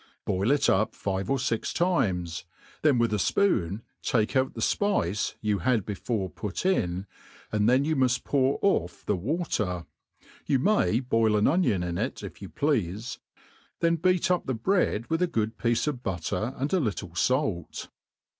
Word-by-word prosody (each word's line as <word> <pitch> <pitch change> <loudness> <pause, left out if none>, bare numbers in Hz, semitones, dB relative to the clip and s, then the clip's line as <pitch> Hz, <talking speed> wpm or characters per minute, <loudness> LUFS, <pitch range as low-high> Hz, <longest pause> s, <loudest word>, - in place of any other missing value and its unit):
Boil 95 +4 0
it 145 +1 +3
up 105 +3 +2
five 95 -1 -3
or 135 - +2
fix 125 -3 -1
times, 95 - 0 0.4
then 150 -5 +4
witli 115 -2 +2
a - - +3
fpoon 105 - +1 0.2
take 110 +1 0
out 130 0 +1
the - - -6
fpice 110 - 0
you 105 -2 0
had 110 +1 +1
before 105 -1 -2
put 105 - -5
in, 95 - +1 0.5
and 105 +1 +2
then 130 +3 +4
you 160 - +1
n)u 130 -2 +4
ft 125 0 -1
pour 135 -1 +2
off 90 - 0
the 105 - +1
water 105 - -2 0.6
(you 135 - +3
may 130 - +2
boil 115 -4 +2
an 105 - +3
onion 160 - +2
in 85 -1 -3
it - - -3
if - - -9
you - - -7
pleafe); 115 - -1 0.6
then 170 0 +3
beat 180 +2 +2
up 180 - 0
the 130 - 0
bread 115 - +1
with 165 +1 0
a 180 - +3
good 110 -6 -2
piece 115 -1 +1
of 145 -5 -2
butter 100 - -2
and 140 +6 -2
a 190 - +4
little 100 - -3
fait. 105 - -1
115 Hz, 175 wpm, -27 LUFS, 100-145 Hz, 0.6 s, then